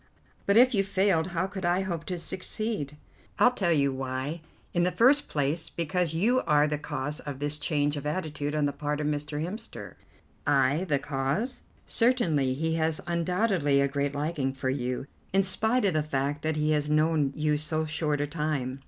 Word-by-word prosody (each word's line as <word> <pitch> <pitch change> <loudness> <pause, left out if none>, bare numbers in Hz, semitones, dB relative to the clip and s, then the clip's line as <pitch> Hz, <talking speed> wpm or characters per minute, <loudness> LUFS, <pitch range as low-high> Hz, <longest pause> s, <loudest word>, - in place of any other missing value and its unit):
"But 200 +2 +4
if 255 +2 +6
you 200 -3 +3
failed, 190 -4 +2
how 175 0 -1
could 190 0 -6
I 175 +2 +2
hope 170 -4 -3
to 180 - -3
succeed?" 185 -3 -3 0.4
"I'll 250 - +6
tell 190 -8 0
you 140 -4 +2
why. 130 +4 -3 0.3
In 175 - +2
the 180 +1 +2
first 270 +8 +4
place 150 +3 -1
because 170 0 -1
you 235 +9 +3
are 150 0 +5
the 150 -1 -1
cause 150 0 -3
of 145 -2 -6
this 145 +2 0
change 145 -1 0
of 145 0 -4
attitude 150 -2 -2
on 150 -1 +2
the 145 - +1
part 150 +1 -2
of 150 - -2
Mr. 150 +1 -2
Hemster." 215 +6 -7 0.5
"I 145 +4 +3
the 150 -6 +1
cause?" 140 - -2 0.2
"Certainly. 165 - +2
He 160 +3 -1
has 160 -1 0
undoubtedly 175 -3 +1
a 140 - +3
great 140 0 -2
liking 145 -2 -1
for 130 -1 -2
you, 125 -1 -2 0.3
in 195 0 +4
spite 220 +6 +1
of 190 - +2
the 155 - +2
fact 145 0 -2
that 155 0 -1
he 150 0 +1
has 150 -1 +1
known 155 -2 +2
you 150 0 +1
so 155 +1 -1
short 150 -1 -1
a - - +1
time. 145 -4 -2
155 Hz, 190 wpm, -28 LUFS, 145-180 Hz, 0.5 s, if